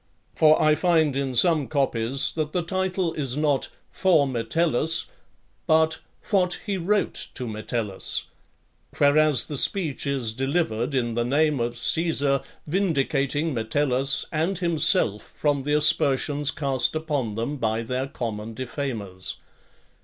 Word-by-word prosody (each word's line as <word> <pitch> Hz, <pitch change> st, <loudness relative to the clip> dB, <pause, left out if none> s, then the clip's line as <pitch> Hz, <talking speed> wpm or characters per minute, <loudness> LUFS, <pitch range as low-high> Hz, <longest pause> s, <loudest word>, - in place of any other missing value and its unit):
For 155 Hz, 0 st, +4 dB
I 155 Hz, 0 st, +4 dB
find 160 Hz, -3 st, +2 dB
in 135 Hz, -2 st, -2 dB
some 150 Hz, +2 st, +3 dB
copies 135 Hz, -3 st, 0 dB
that 155 Hz, -2 st, -3 dB
the 180 Hz, -, 0 dB
title 185 Hz, -1 st, -2 dB
is 135 Hz, -4 st, -2 dB
not 150 Hz, -3 st, +1 dB, 0.2 s
"For 170 Hz, -6 st, +3 dB
Metellus," 140 Hz, +5 st, +1 dB, 0.6 s
but 160 Hz, 0 st, +3 dB, 0.3 s
"What 180 Hz, -3 st, +2 dB
he 205 Hz, -3 st, -2 dB
wrote 200 Hz, +4 st, -1 dB
to 125 Hz, -, -4 dB
Metellus;" 110 Hz, -2 st, -2 dB, 0.7 s
whereas 145 Hz, -3 st, +4 dB
the 145 Hz, -, -5 dB
speech 155 Hz, -4 st, +1 dB
is 130 Hz, -6 st, -1 dB
delivered 135 Hz, -1 st, -1 dB
in 120 Hz, -3 st, 0 dB
the 120 Hz, +1 st, 0 dB
name 145 Hz, +3 st, +1 dB
of 120 Hz, 0 st, -2 dB
Caesar, 145 Hz, -1 st, 0 dB, 0.2 s
vindicating 150 Hz, -3 st, 0 dB
Metellus 130 Hz, +4 st, +1 dB
and 165 Hz, +5 st, -1 dB
himself 170 Hz, -, +3 dB
from 145 Hz, -3 st, -2 dB
the 145 Hz, 0 st, +1 dB
aspersions 145 Hz, -1 st, +3 dB
cast 135 Hz, -1 st, 0 dB
upon 145 Hz, -9 st, -2 dB
them 120 Hz, +7 st, -3 dB
by 115 Hz, -2 st, -1 dB
their 130 Hz, +3 st, -3 dB
common 115 Hz, -4 st, -5 dB
defamers. 115 Hz, -7 st, -5 dB
140 Hz, 130 wpm, -24 LUFS, 125-160 Hz, 0.7 s, For